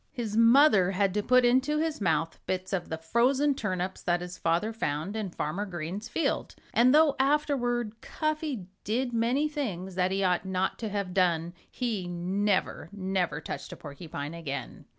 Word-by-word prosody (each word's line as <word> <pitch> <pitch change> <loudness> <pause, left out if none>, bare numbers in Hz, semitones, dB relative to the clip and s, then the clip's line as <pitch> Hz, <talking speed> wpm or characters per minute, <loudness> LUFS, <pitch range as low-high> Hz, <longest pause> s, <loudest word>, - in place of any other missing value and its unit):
His 230 -6 -3
mother 230 -5 +6
had 195 0 +1
to 210 - +1
put 255 +3 +4
into 260 +5 +3
his 315 -5 -1
mouth 165 -3 0
bits 185 +1 -2
of 180 -3 -2
the 160 - -3
frozen 255 - +2
turnips 185 -6 -3
that 175 0 +1
his 180 0 -6
father 175 +8 0
found 160 -1 -2
in 215 -3 -2
Farmer 170 +3 -3
Green's 180 +6 -5
field. 330 - -1 0.2
And 245 +2 +5
though 300 0 +5
afterward 245 -6 +1
Cuffy 310 - -2 0.2
did 245 +3 -1
many 240 +6 +2
things 205 - -4
that 180 0 +1
he 195 +1 0
ought 180 -2 +2
not 190 0 -1
to 225 - -3
have 200 -3 -3
done, 175 -3 +1 0.2
he 220 -8 -2
never, 185 +3 -1
never 190 -5 -1
touched - - -6
a - - -10
porcupine 145 0 -7
again. 155 -5 -6
200 Hz, 170 wpm, -28 LUFS, 180-245 Hz, 0.2 s, mother